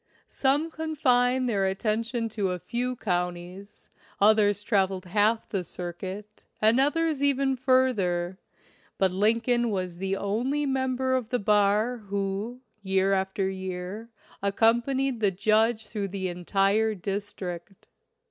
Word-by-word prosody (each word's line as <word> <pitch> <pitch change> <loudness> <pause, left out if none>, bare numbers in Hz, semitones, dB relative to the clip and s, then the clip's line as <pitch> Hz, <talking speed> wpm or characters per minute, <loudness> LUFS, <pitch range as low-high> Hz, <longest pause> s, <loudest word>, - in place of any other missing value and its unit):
Some 285 +4 +1
confined 260 -6 +1
their 200 -5 +1
attention 230 +4 -1
to 205 -3 -1
a 180 - -2
few 245 +6 -3
counties, 180 0 -4 0.3
others 205 -1 +4
traveled 190 -3 +1
half 210 +5 +1
the 195 -3 -2
circuit, 185 +5 -7 0.2
and 220 +4 +4
others 305 +1 +1
even 275 -1 +2
further; 205 -9 +1 0.6
but 190 -1 +2
Lin 215 +5 +2
coln 240 0 +1
was 185 -4 -3
the 195 0 -1
only 250 +10 -1
member 260 -1 0
of 255 -4 -1
the 250 - +1
bar 210 +3 +2
who, 200 +3 -4 0.2
year 190 0 +1
after 190 0 0
year, 190 +3 -5 0.3
accompanied 235 +6 +1
the 210 -2 +3
judge 220 +4 +2
through 210 -2 -4
the 190 -1 -3
entire 195 +5 +1
district. 195 -1 -6
210 Hz, 125 wpm, -27 LUFS, 190-245 Hz, 0.6 s, others